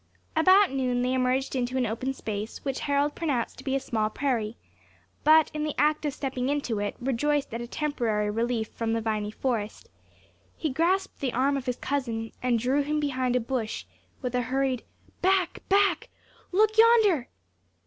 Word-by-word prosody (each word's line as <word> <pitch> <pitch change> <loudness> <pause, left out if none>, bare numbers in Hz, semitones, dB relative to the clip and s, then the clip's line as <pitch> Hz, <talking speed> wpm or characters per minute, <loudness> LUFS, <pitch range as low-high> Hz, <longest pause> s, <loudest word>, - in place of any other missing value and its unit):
About 375 +4 +6
noon 250 -2 0
they 255 +1 +1
emerged 260 +1 0
into 250 0 -1
an 255 - +2
open 235 +4 -2
space, 215 +2 -5
which 270 -2 -2
Harold 285 0 +1
pronounced 280 -10 -2
to - - -10
be 270 0 -1
a - - +2
small 220 -4 -1
prairie; 235 -3 -1 0.7
but 315 0 +6
in 305 0 -2
the 305 -1 -2
act 300 +1 +2
of 290 - -1
stepping 260 -2 -2
into 280 -7 -1
it, 205 0 -2
rejoiced 270 +2 0
at 230 - -3
a 240 - -5
temporary 230 -8 -1
relief 230 0 -1
from 225 -1 -2
the 225 - 0
viny 215 -2 -1
forest, 220 -2 -3 0.7
he 310 - -1
grasped 360 +7 0
the 260 -3 -2
arm 270 +3 +2
of 270 -2 -4
his 250 - -1
cousin, 230 -5 -2
and 250 -2 +2
drew 255 +5 +1
him 300 +2 -1
behind 260 -4 0
a - - +4
bush, 230 -2 -3 0.4
with 250 -1 -2
a 250 - +1
hurried, 260 0 -1 0.4
"Back! 375 -1 +2
back! 400 +1 +3 0.4
Look 435 +3 +3
yonder!" 440 - +5
260 Hz, 180 wpm, -27 LUFS, 235-295 Hz, 0.7 s, About